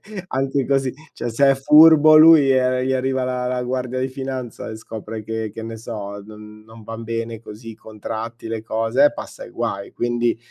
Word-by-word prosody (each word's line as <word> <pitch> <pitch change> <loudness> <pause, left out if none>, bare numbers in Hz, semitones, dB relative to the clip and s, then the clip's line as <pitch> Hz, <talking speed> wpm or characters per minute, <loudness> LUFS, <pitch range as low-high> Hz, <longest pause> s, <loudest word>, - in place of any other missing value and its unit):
anche 200 -3 -9
anche 135 -2 -1
così, 135 -2 0 0.2
cioè 120 - -5
se 135 +4 +3
è 135 - +3
furbo 155 +2 +7
lui, 155 -3 +7
ehm, 130 -1 +2
gli 130 +1 0
arriva 130 0 -1
la 125 0 -2
la 125 0 -2
guardia 125 0 -3
di 130 - -1
finanza 130 -3 -6
e - - -7
scopre 110 0 -8
che, 110 -1 -5
che 115 - -7
ne 115 0 -7
so, 100 -3 -7
non 105 0 -13
non 110 0 -14
van 115 +1 -8
bene 115 0 -4
così, 110 0 -11
contratti, 110 +2 -7
le 110 -1 -4
cose, 115 +5 +1
eh, - - +4
passa - - -9
i - - -13
guai. 100 0 -4
Quindi, 120 -1 -1
120 Hz, 200 wpm, -20 LUFS, 110-130 Hz, 0.2 s, furbo